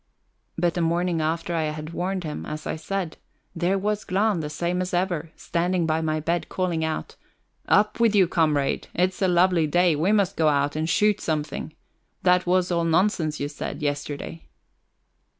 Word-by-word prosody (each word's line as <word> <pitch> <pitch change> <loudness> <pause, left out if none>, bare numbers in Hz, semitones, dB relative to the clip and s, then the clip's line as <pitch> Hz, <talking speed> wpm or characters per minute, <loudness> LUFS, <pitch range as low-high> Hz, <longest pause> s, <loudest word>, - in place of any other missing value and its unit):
But 170 0 +1
the 175 - -1
morning 170 0 +1
after 165 +2 -1
I 160 -2 0
had 155 +1 -5
warned 185 +1 -2
him, 150 -2 -5
as 155 0 -6
I - - -2
said, 180 +1 -4 0.4
there 175 +3 +1
was 210 +2 -1
Glahn 200 0 +1
the 150 -2 -3
same 175 +4 -1
as 180 0 -2
ever, 175 -3 -1
standing 175 0 0
by 160 0 +1
my 155 -1 0
bed, 170 +3 -1
calling 175 -3 -1
out: 160 0 -3 0.5
"Up 210 +2 +3
with 230 -2 +4
you, 190 -3 +5
comrade! 155 -5 +1
It's 180 +2 0
a 190 - +4
lovely 175 -2 +3
day; 175 +1 +3
we 165 +7 +1
must 200 -4 +2
go 160 - +3
out 145 -1 +2
and 155 +1 -1
shoot 210 +2 +2
something. 155 0 -3 0.5
That 180 0 +3
was 180 0 +2
all 170 -1 +1
nonsense 165 -2 +1
you 145 - -1
said 145 +1 -6
yesterday." 145 +2 -4
170 Hz, 180 wpm, -25 LUFS, 155-185 Hz, 0.5 s, you